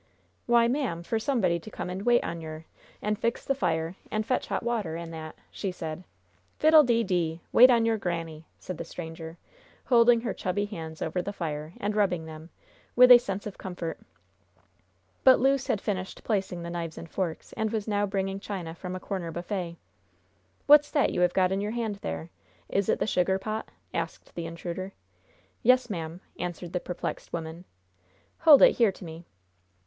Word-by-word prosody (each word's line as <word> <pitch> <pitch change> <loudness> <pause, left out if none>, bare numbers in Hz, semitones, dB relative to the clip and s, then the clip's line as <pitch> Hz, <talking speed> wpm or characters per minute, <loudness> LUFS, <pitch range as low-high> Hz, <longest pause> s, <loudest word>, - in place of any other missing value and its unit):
"Why, 235 -1 +5
ma'am, 240 - -1
for 225 +5 -1
somebody 215 -9 +1
to 215 - -11
come - - -5
an' 190 +2 -5
wait 240 0 +4
on 170 - -4
yer, 155 0 -8 0.4
an' 210 0 0
fix 230 +3 -2
the 275 - +2
fire, 165 -9 -1 0.2
an' 215 0 -1
fetch 250 +3 -1
hot - - -2
water, 215 -9 -1
an' 170 -1 -7
that," 160 -1 -7 0.2
she 195 - -3
said. 165 -1 -6 0.5
"Fiddle 310 0 +7
de 235 -3 +2
dee! 170 -5 -1
Wait 250 +2 +8
on 235 -2 +4
your 225 -1 +1
granny!" 165 -3 -4
said 185 - -7
the - - -3
stranger, 165 -1 -8 0.5
holding 235 -1 +5
her 230 -4 -2
chubby 205 +3 -1
hands 160 -6 -6
over 170 +3 -1
the 200 - -4
fire, 155 -4 -5
and 205 +1 -2
rubbing 185 -6 +1
them, 160 +1 -10 0.5
with 250 +1 +8
a 245 - +11
sense 200 -4 -4
of 210 - -7
comfort. 175 -3 -5 1.2
But 260 -1 +7
Luce 270 +1 +2
had 210 - +1
finished 190 -2 -4
placing 190 -5 -1
the 170 - -5
knives 170 -2 -4
and 165 - -7
forks, 170 -1 -4
and 220 -1 -1
was 220 -2 -2
now 205 -1 +1
bringing 195 0 -2
china 185 -5 -5
from 180 +2 -6
a - - -4
corner 185 -3 -4
buffet. 175 0 -4 0.9
"What's 295 0 +7
that 290 - +2
you 180 - 0
have 180 0 +3
got 185 -1 +3
in 195 +1 0
your 210 +2 -2
hand 225 -4 -2
there? 170 -4 -5 0.4
Is 200 -1 0
it - - +3
the - - 0
sugar 190 -2 +2
pot?" 215 +3 -4 0.2
asked 165 -1 -4
the 170 -1 -4
intruder. 175 +3 -6 0.7
"Yes, 250 -1 +4
ma'am," 165 -1 -5 0.2
answered 175 -1 -5
the 180 - 0
perplexed 180 0 -5
woman. 165 +1 -5 0.7
"Hold 310 -4 +8
it - - +6
here 230 -4 +4
to 190 - -11
me." 165 +1 -10
190 Hz, 185 wpm, -28 LUFS, 170-220 Hz, 1.2 s, a